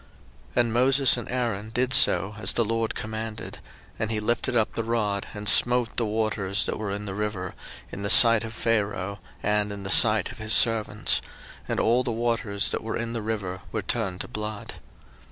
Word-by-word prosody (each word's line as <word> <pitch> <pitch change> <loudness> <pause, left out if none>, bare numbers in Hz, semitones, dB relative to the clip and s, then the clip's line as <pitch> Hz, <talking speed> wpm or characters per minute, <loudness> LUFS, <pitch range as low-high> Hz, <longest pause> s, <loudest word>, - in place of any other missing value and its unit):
02:007:020 120 - +4
And 115 -2 -2
Moses 130 +2 +4
and 120 - -7
Aaron 115 -5 -3
did 125 +3 -1
so, 95 -2 +4
as - - +1
the 115 - +1
LORD 115 +1 -2
commanded; 110 0 -6 0.4
and 110 - -2
he 110 -1 -2
lifted 120 +3 -1
up 110 - 0
the 115 - -3
rod, 105 -4 -2
and 105 0 -7
smote 120 +3 +4
the 115 - -1
waters 105 -2 -1
that - - -4
were 105 -2 -4
in 100 +1 -5
the 95 - -5
river, 105 -3 -4 0.4
in 100 - -7
the 100 - -3
sight 115 0 +7
of 110 -1 -8
Pharaoh, 100 -3 -2 0.2
and 105 0 0
in 100 -1 -7
the 95 - -4
sight 110 -2 +5
of 120 - -13
his 110 0 -1
servants; 110 -2 +3 0.5
and - - -2
all 120 +3 +2
the 120 - -3
waters 115 -3 0
that - - -3
were 110 - -4
in 115 0 -4
the 115 - -3
river 100 -4 -4
were 110 -3 -3
turned 95 -4 -2
to - - -5
blood. 105 -2 -7
110 Hz, 200 wpm, -25 LUFS, 105-115 Hz, 0.5 s, sight